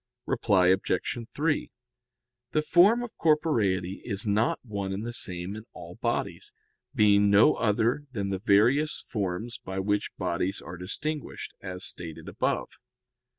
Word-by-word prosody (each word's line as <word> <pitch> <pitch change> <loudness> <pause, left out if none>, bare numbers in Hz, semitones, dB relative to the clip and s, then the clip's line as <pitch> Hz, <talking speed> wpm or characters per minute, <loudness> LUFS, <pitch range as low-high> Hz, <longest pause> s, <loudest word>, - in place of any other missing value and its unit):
Reply 100 -8 +3
Obj. 95 +5 0
3: 150 +1 -1 0.8
The 155 - +3
form 200 +10 +5
of 240 - -8
corporeity 110 - +1
is 105 -1 -3
not 105 +2 +2
one 100 -4 -3
and 100 +3 -3
the 120 - -4
same 90 -2 -3
in 110 +1 -9
all - - -10
bodies, - - -3 0.4
being 105 -3 +5
no 100 +2 +6
other 115 +6 +1
than 100 -5 -3
the 95 -1 -2
various 120 +9 +3
forms 105 +1 -3
by 95 0 -6
which 100 +2 0
bodies 90 +1 -1
are 90 - -8
distinguished, 145 - -4
as 90 0 -5
stated 80 -3 -6
above. - - -1
105 Hz, 140 wpm, -28 LUFS, 95-125 Hz, 0.8 s, no